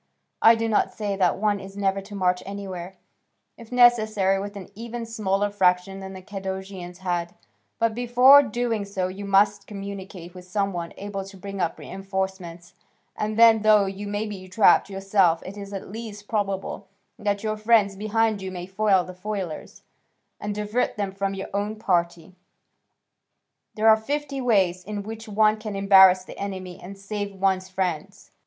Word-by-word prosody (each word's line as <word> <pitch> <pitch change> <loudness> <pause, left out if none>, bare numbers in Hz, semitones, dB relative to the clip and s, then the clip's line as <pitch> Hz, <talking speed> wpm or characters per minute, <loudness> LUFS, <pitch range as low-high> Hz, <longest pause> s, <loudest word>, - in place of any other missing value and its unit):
I 225 +1 +7
do 225 0 -1
not 220 - +1
say 205 -3 -3
that 185 -3 +2
one 205 0 +1
is 195 +1 -11
never 195 -1 0
to 205 +1 -11
march 180 -2 +1
anywhere, 190 -2 -7 0.6
if 230 -1 -14
necessary, 215 -6 +4
with 205 +1 -7
an 195 -2 -9
even 230 +2 -6
smaller 205 -2 -1
fraction 190 -1 +1
than 190 0 -8
the 185 -1 -10
Cadousians 190 -2 -7
had; 175 +1 -2 0.4
but, 230 -1 +1
before 245 +4 +7
doing 240 -3 -2
so 195 -2 -3
you 200 +2 -7
must 200 0 +2
communicate 195 -3 -8
with 180 -1 -11
some 195 +1 -1
one 170 -1 -5
able 195 -1 -5
to 195 0 -12
bring 195 0 -6
up 170 - -1
reinforcements, 190 -3 -5 0.4
and 215 0 -3
then, 225 -1 +7
though 215 -1 +5
you 195 +1 -5
may 205 +1 -2
be 195 -3 -7
trapped 200 +2 +4
yourself, 195 -3 +2
it 190 - -8
is 200 -1 -8
at 195 -1 -7
least 210 -2 -8
probable 200 -2 -3 0.3
that 205 -1 -1
your 215 -1 -1
friends 215 -2 +3
behind 215 +1 0
you 190 - -4
may 180 -1 -6
foil 190 0 +2
the 185 - -9
foilers, 185 -3 -6 0.6
and 205 0 -4
divert 210 +4 -1
them 200 -2 -2
from 195 0 -3
your 195 - -6
own 205 +2 -2
party: 175 -4 -1 1.4
there 220 +1 +2
are 220 0 +8
fifty 275 +4 -3
ways 190 -7 +2
in 205 +1 -5
which 225 +2 -8
one 215 +1 +3
can 215 -2 -6
embarrass 190 -2 +6
the - - -11
enemy 185 -3 -6
and 195 +2 -9
save 200 0 -5
one's 190 -1 +1
friends. 180 -5 -4
200 Hz, 170 wpm, -24 LUFS, 190-215 Hz, 1.4 s, are